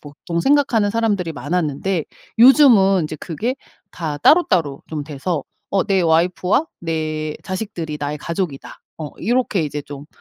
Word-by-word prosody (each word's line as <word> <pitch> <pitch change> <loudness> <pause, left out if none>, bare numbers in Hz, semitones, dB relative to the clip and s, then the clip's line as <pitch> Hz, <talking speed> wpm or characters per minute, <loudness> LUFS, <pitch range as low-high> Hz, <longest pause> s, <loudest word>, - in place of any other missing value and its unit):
보통 155 +3 -5
생각하는 255 -4 +2
사람들이 205 -6 0
많았는데 160 +3 -2 0.3
요즘은 230 - +6
인제 155 0 -4
그게 195 - -3 0.4
다 155 -4 -4
따로따로 170 - +3
좀 150 -2 -4
돼서 150 +2 -3 0.3
'어 195 -1 +1
내 195 -2 +2
와이프와 180 - +2
내 155 -2 -3
자식들이 185 -6 -5
나의 145 +1 -2
가족이다.' 170 -3 -5 0.2
어 155 -2 -5
이렇게 240 -5 0
이제 145 -1 -4
좀 145 0 -10
170 Hz, 310 characters per minute, -20 LUFS, 150-200 Hz, 0.4 s, 요즘은